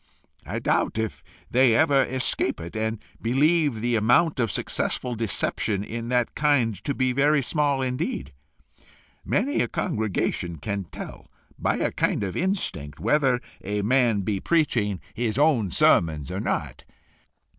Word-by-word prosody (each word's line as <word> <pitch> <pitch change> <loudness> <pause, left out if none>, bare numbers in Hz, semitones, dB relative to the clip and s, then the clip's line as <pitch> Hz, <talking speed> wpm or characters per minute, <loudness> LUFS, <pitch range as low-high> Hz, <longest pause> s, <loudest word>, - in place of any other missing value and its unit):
I - - -3
doubt - - 0
if 110 -1 -3 0.3
they 125 -2 +5
ever 145 -2 +4
escape 130 0 0
it, 85 +4 -8
and 110 +1 -1 0.2
believe 145 0 +2
the 120 0 +1
amount 125 +8 +3
of 115 -2 +1
successful 125 +6 -1
deception 105 -2 -1
in 115 +2 -5
that 125 -1 +1
kind 145 -7 +2
to 140 - -1
be 130 -1 +1
very 145 +2 +3
small 145 -1 +1
indeed. 125 - -3 0.9
Many 270 +8 0
in - - +3
a 120 - +1
congregation 100 -7 -2
can 100 +5 -4
tell, - - -9 0.3
by - - +1
a - - 0
kind - - 0
of 95 - -3
instinct, 170 - -2
whether 135 -5 +2 0.2
a 105 +1 -2
man 120 -2 +3
be 100 0 -1
preaching 120 - +1
his 115 0 -2
own 140 -9 +3
sermons 80 -4 +2
or - - -3
not. - - -3
120 Hz, 145 wpm, -25 LUFS, 105-140 Hz, 0.9 s, they